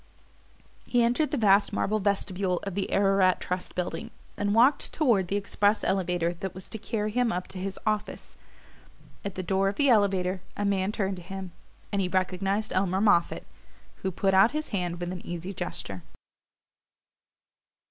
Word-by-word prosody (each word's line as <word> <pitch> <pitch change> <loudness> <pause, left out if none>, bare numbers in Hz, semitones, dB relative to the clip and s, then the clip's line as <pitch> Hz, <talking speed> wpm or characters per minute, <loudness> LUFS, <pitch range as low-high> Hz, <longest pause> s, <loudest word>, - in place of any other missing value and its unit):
He 245 -1 +3
entered 245 +6 +2
the 295 - -1
vast 200 -3 +4
marble 215 +2 0
vestibule 195 -2 0
of 200 - -4
the 195 +1 -2
Ararat 195 -2 +3
Trust 180 0 -4
Building 185 +5 -3 0.3
and 205 0 0
walked 255 +5 +4
toward 230 - +2
the 195 - -1
express 205 +1 +1
elevator 180 -2 0
that 190 -1 -5
was 185 - -8
to 220 - -5
carry 215 -1 -2
him 245 +1 +1
up 180 -2 -2
to 185 - -7
his 195 +1 -4
office. 215 -1 -2 0.9
At 200 -2 -5
the 185 - -3
door 195 +2 +1
of 200 - -5
the 280 +3 +3
elevator 195 -4 +2 0.2
a 205 - -1
man 195 0 +1
turned 195 -3 -2
to - - -8
him, 190 +1 -7 0.4
and 200 -1 +1
he 185 - 0
recognized 190 +3 -1
Elmer 190 0 +1
Moffatt, 200 -5 +2 0.5
who 190 - -2
put 195 +1 0
out 195 +6 +5
his 310 - -4
hand 175 -4 -2
with 175 0 -3
an 180 - -8
easy 175 +3 -5
gesture. 100 - -5
195 Hz, 170 wpm, -27 LUFS, 185-210 Hz, 0.9 s, out